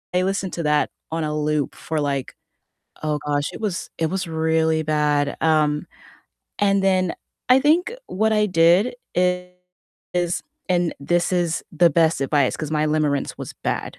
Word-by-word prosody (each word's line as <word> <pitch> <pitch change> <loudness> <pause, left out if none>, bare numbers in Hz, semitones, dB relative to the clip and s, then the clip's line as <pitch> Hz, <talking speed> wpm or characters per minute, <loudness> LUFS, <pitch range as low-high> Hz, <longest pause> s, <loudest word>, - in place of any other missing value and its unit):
listened 190 0 0
to 170 - -3
that 150 0 +2 0.2
on 165 0 -1
a 150 0 -2
loop 150 -2 -1
for 160 -1 -3
like 140 -2 -2 0.7
oh 150 -1 0
gosh, 145 +1 0
it - - -8
was 200 -6 -3
it 160 - +1
was 190 -1 -2
really 160 0 +1
bad- 150 -2 +1
um, 155 0 +2 0.7
and 200 -1 +3
then 185 -2 +2 0.4
I 255 - +8
think 335 - +3
what 220 +3 0
I 210 0 +3
did 180 +6 +4 0.2
is- 180 -1 -3 0.3
and 175 -2 +1
this 175 +5 0
is 175 -2 0
the 170 +1 +4
best 160 0 +2
advice 135 -1 +1
'cause 155 -1 -5
my 155 0 +1
limerence 150 -2 0
was - - -6
bad, - - -3
165 Hz, 155 wpm, -22 LUFS, 150-180 Hz, 0.7 s, I